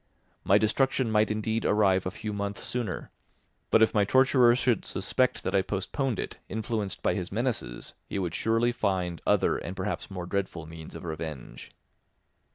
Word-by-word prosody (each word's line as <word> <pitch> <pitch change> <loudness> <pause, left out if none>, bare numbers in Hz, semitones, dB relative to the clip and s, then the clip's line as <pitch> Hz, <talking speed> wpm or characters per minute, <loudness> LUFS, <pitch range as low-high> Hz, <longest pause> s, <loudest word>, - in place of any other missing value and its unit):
My 100 +2 +5
destruction 120 +3 +1
might 105 0 +3
indeed 110 +1 -1
arrive 95 -3 +3
a - - +1
few 105 +3 -5
months 100 -1 -3
sooner, 120 -6 -3 0.6
but 110 - +6
if 110 - +3
my 105 - +4
torturer 130 +1 +5
should 125 -4 +1
suspect - - 0
that - - -2
I 95 - +4
postponed 105 +6 -2
it, - - -5
influenced 110 -3 -3
by - - +3
his 95 -3 -4
menaces, 115 - -2
he - - -4
would 90 -4 -2
surely 115 +4 +2
find 90 -7 -1
other - - +3
and 90 - -6
perhaps 95 +2 -3
more 90 -3 -5
dreadful 90 -3 -3
means 80 0 -10
of - - -8
revenge. 80 -5 -6
100 Hz, 165 wpm, -28 LUFS, 95-115 Hz, 0.6 s, but